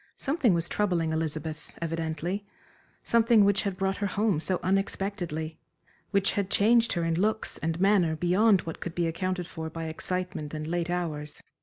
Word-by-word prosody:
Something 270 - +2
was 170 0 0
troubling 175 -6 0
Elizabeth, 160 0 -4
evidently; 165 +3 -2 0.6
something 230 -2 +5
which 200 0 +3
had 200 -3 -3
brought 195 0 0
her 200 - -1
home 200 -3 +1
so 180 +2 0
unexpectedly, 185 -4 -1 0.5
which 200 -1 +2
had 200 -2 -1
changed 230 +4 +4
her 170 - -1
in 165 +1 0
looks 220 +1 0
and 165 +2 -2
manner 190 -5 +3
beyond 185 +4 +4
what 165 - -7
could 175 - -6
be 175 - +1
accounted 180 +2 -2
for 160 -1 -6
by 165 0 -5
excitement 165 -1 -3
and 155 0 -4
late 175 +1 -1
hours. 155 -4 -3
175 Hz, 165 wpm, -28 LUFS, 160-200 Hz, 0.6 s, something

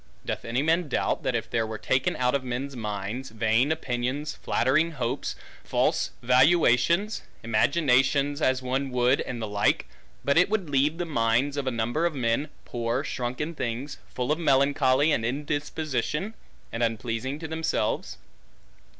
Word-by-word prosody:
Doth - - -4
any 120 +4 0
man 165 +2 +2
doubt, - - 0
that - - -1
if - - -2
there 115 -1 0
were 110 0 -5
taken 130 +4 0
out 125 0 +1
of 140 -2 0
men's 130 +2 -4
minds, 105 +3 -4
vain 115 +5 +2
opinions, 140 0 -2
flattering 155 +7 +1
hopes, 120 -6 -2 0.3
false - - +1
valuations, 155 - +4 0.2
imaginations 140 +4 +2
as 130 -2 +2
one 135 +2 -1
would, 125 +1 +2
and 125 -2 -5
the 110 - -3
like, 105 -2 +1 0.4
but 140 +3 +4
it 180 - +4
would 200 -8 -1
leave 145 +3 +2
the 175 - -2
minds, 120 -1 +1
of 140 -2 -3
a - - +4
number 120 +8 0
of 165 - -5
men, 125 +4 0 0.2
poor 120 +3 -2
shrunken 130 +4 -3
things, 125 0 -4
full 125 +3 -2
of 155 - +1
melancholy 140 -1 +3
and 120 - +1
indisposition, 150 - -2 0.4
and 115 - -4
unpleasing 115 +3 -1
to 160 +1 -6
themselves? 160 0 -1
130 Hz, 155 wpm, -26 LUFS, 120-150 Hz, 0.4 s, valuations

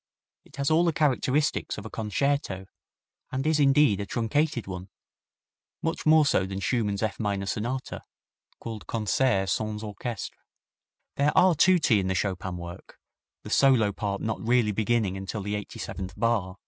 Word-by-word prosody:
It - - -17
has 140 +2 0
all 160 +2 +4
the 170 -2 +2
characteristics 145 0 +1
of 105 - -7
a - - -6
concerto, 110 -2 -1 0.7
and 135 +2 -2
is 155 -1 +2
indeed 135 -7 +4
a 100 - -3
truncated 125 +4 0
one 95 0 -7 0.9
much 165 -1 -2
more 155 -1 +6
so 95 -9 +2
than 95 0 -4
Schumann's 105 -2 -1
F 110 - -2
minor 100 -2 -1
Sonata, 120 +6 -3 0.6
called 110 -8 -7
Concert 110 -2 +1
Sans 105 +2 -2
Orchestre. 110 +1 -6 0.8
There 145 +1 +3
are 185 0 +6
tutti 160 - +4
in 95 - -1
the 95 - 0
Chopin 95 -1 -2
work, 85 0 -10 0.5
the - - -8
solo 125 -7 +4
part 100 0 -3
not 110 -1 -2
really 115 -1 +2
beginning 105 -2 0
until 95 +2 -5
the 105 +1 -3
eighty 105 -1 -5
seventh 95 +1 -6
bar. 105 -5 0
110 Hz, 160 wpm, -27 LUFS, 100-135 Hz, 0.9 s, more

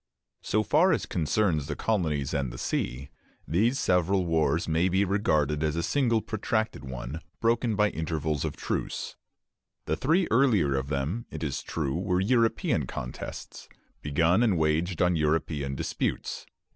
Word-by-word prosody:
So 110 +1 +1
far 175 - +4
as - - -1
concerns 80 -3 0
the 75 - -3
colonies 80 -11 -1
and 70 -4 -1
the - - -8
sea, 65 +3 -3 0.4
these 110 - +2
several 90 +1 +2
wars 80 -1 +1
may 85 +3 +2
be 95 +2 +2
regarded 80 -7 +1
as 75 0 0
a 85 - -1
single 115 -1 +2
protracted 110 -1 -2
one, 65 +4 -6 0.2
broken 115 -1 +1
by 105 0 +3
intervals 80 -2 -2
of - - -3
truce. - - -3 0.7
The 80 - 0
three 165 - +2
earlier 110 - +3
of 65 0 -2
them, 75 +11 -2
it - - -6
is 70 -4 -2
true, 70 -5 -3
were 90 +1 0
European 115 +3 +1
contests, - - -7 0.3
begun 80 +7 +2
and 110 -7 +3
waged 80 +3 +1
on 90 0 +3
European 75 -3 0
disputes. - - -3
85 Hz, 150 wpm, -27 LUFS, 75-105 Hz, 0.7 s, far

